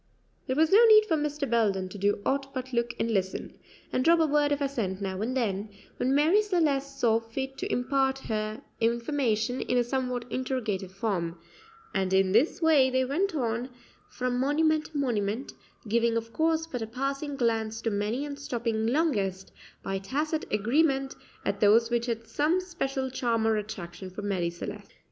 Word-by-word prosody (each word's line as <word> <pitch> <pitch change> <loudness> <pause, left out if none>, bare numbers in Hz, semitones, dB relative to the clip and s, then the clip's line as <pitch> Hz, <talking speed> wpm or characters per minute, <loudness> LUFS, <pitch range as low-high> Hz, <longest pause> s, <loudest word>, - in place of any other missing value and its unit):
There 260 - 0
was 315 +2 +3
no 430 +4 +8
need 430 -1 +8
for 335 - +1
Mr. 295 -1 -2
Belden 205 -5 +1
to 205 - -9
do 205 +1 +1
aught 275 0 -1
but 260 0 -5
look 235 0 0
and 230 - 0
listen, 190 -3 -2 0.4
and 255 - +1
drop 335 +3 +5
a 320 - +4
word 295 -1 +2
of 285 - +1
assent 230 -10 -2
now 190 -1 -3
and 250 +4 -1
then, 210 -3 -1 0.3
when 260 +2 +1
Marie 320 +9 +5
Celeste 285 -9 0
saw 225 -3 +3
fit 265 +4 -5
to - - -3
impart 265 +1 +1
her 215 -3 -4 0.2
information 235 0 0
in 250 - 0
a 245 - +4
somewhat 250 -1 -2
interrogative 225 -8 -2
form; 190 -4 -2 0.6
and 190 -1 0
in 190 0 +3
this 255 - +2
way 295 -5 +5
they 260 0 +1
went 340 +7 0
on 240 -2 -1 0.4
from 250 0 -2
monument 305 +3 +2
to 310 - -7
monument, 230 -2 -1 0.3
giving 230 +1 +2
of 230 0 -5
course 320 0 +1
but 255 -7 -5
a 220 - -3
passing 275 +4 -3
glance 225 -3 0
to 225 - 0
many 210 +7 -1
and 285 -1 -6
stopping 230 -5 -1
longest, 210 - 0 0.3
by 195 0 -2
tacit 300 +10 -2
agreement, 270 +5 +2 0.3
at - - -1
those 225 +3 +5
which 235 0 0
had 230 -1 -3
some 300 +10 +1
special 270 -8 -3
charm 235 -3 0
or 225 0 +3
attraction 195 -3 -6
for 190 +3 -8
Marie 185 -4 0
Celeste. 170 0 -8
245 Hz, 180 wpm, -28 LUFS, 215-280 Hz, 0.6 s, no